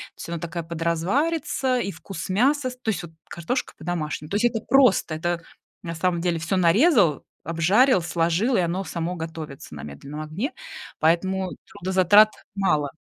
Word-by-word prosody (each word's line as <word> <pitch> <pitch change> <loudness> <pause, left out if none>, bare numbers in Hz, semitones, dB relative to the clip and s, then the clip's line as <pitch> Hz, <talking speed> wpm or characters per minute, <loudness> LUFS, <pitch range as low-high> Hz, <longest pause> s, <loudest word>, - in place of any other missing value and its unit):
Всё, 170 - -7
она 170 - -3
такая 170 0 -4
подразварится, 195 - 0
и 200 -4 -2
вкус 190 -3 -7
мяса 255 +6 +2
с - - -10
то 240 -3 -4
есть 185 -5 -1
вот 170 - -9 0.2
картошка 245 +10 -3
по-домашнему, 155 -2 -4
то - - -1
есть 215 +3 +2
это 230 -2 +1
просто. 255 -11 +4
Это 170 +1 -2 0.4
на 165 -1 -4
самом 170 0 0
деле 175 -2 0
всё 170 +4 -1
нарезал, 185 - +4 0.2
обжарил, 185 - +3
сложил, 170 +8 +1
и - - +3
оно 175 +3 -1
само 175 -1 -3
готовится 160 - -7
на 75 - -8
медленном 140 - -8
огне. 185 - -4 0.5
Поэтому 185 +3 +1 0.2
трудозатрат 195 +2 +5 0.3
мало. 155 -8 +1
175 Hz, 160 wpm, -24 LUFS, 165-210 Hz, 0.5 s, трудозатрат